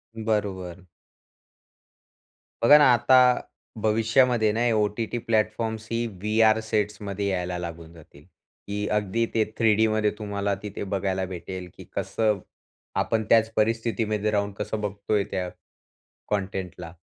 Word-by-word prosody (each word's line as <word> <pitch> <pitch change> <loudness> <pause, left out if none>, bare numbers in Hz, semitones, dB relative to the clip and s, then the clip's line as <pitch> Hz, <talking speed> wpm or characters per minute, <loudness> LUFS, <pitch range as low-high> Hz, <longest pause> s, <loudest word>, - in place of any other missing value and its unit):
बरोबर. 95 -5 -3 1.8
बघा 145 +6 +9
ना, 150 - +6
आता 130 +2 +5 0.6
भविष्यामध्ये 115 +2 +3
आहे 105 - +2
ना 115 - -1
हे 120 - +3
ओ-टी-टी 105 +2 -1
प्लॅटफॉर्म्सही 110 +1 -1 0.2
व्हीआर 110 +1 +3
सेट्समध्ये 105 -2 -1
यायला 90 -2 -2
लागून 85 -1 -7
जातील, 75 -3 -16
की 100 +3 -7
अगदी 105 +3 0
ते 110 - +3
3 110 -2 +4
डीमध्ये 110 -1 +2
तुम्हाला 100 -1 -2
तिथे 105 -1 -5
बघायला 95 -1 -1
भेटेल, 90 +1 -7
की - - -10
कसं 110 -3 0 0.6
आपण 110 -1 0
त्याच 115 0 +4
परिस्थितीमध्ये 110 -1 0
राहून 100 -1 0
कसं 105 +1 -3
बघतोय 100 0 -1
त्या 90 -2 -2 0.8
कॉन्टेंटला 95 -4 -4
105 Hz, 120 wpm, -25 LUFS, 95-110 Hz, 1.8 s, बघा